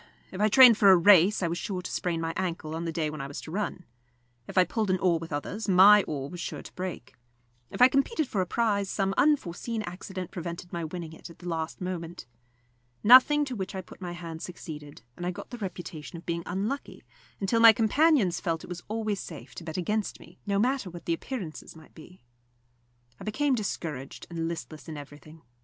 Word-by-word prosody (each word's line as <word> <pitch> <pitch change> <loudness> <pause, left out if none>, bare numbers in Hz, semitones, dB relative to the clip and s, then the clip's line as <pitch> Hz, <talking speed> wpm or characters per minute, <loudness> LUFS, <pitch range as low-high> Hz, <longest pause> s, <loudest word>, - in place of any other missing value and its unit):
If 190 - -5
I 210 - +5
trained 245 -1 +8
for 200 - +7
a 190 - +8
race, 190 +2 +6
I - - +2
was 170 +1 -2
sure 185 -3 -4
to - - -6
sprain 170 -2 -1
my 165 0 -2
ankle 170 -4 -3
on 165 +1 -4
the 165 - -2
day 160 -2 -1
when 155 -2 -6
I 135 - -5
was 140 - -7
to 155 - -9
run. 190 -1 -3 0.6
If - - -8
I 185 - +8
pulled 210 +3 -2
an 185 - +3
oar 175 -2 +2
with 165 0 -8
others, 200 +9 -4
my 200 +3 +8
oar 140 -3 -3
was 175 +4 -9
sure - - -5
to - - -12
break. 180 -8 -6 0.6
If - - +2
I - - +10
competed 275 - 0
for 200 - -1
a 180 - -2
prize, 205 -2 0
some 195 -1 0
unforseen 230 - +1
accident 185 0 -7
prevented 170 0 -6
my 170 -1 -3
winning 165 0 -6
it 160 - -11
at 170 - -14
the 180 - -10
last 160 0 -3
moment. 175 -5 -5 0.8
Nothing 260 +6 +7
to 260 -3 -5
which 195 -2 -5
I 190 - -3
put 185 - -15
my 175 -1 -5
hand 165 -2 -7
succeeded, 150 -5 -9
and 175 - -8
I 175 - -1
got 180 - -8
the 245 - -7
reputation 175 -4 -7
of 170 - -12
being 170 0 -2
unlucky, 205 +10 -4 0.4
until 210 +4 +1
my 230 0 +10
companions 225 - +3
felt 165 -3 -2
it - - -11
was 175 0 -6
always 215 -2 -2
safe - - -9
to - - -8
bet 160 0 -6
against 210 +4 -2
me, 175 +2 -16
no 200 -1 +1
matter 250 -1 +1
what 170 -1 -10
the 170 - +1
appearances 175 -5 -6
might 160 -1 -16
be. 170 +1 -15 1.0
I - - -9
became 275 +6 0
discouraged 160 - -4
and 165 -1 -2
listless 165 -1 -7
in 155 - -6
everything. 145 +2 -12
180 Hz, 220 wpm, -28 LUFS, 165-210 Hz, 1.0 s, I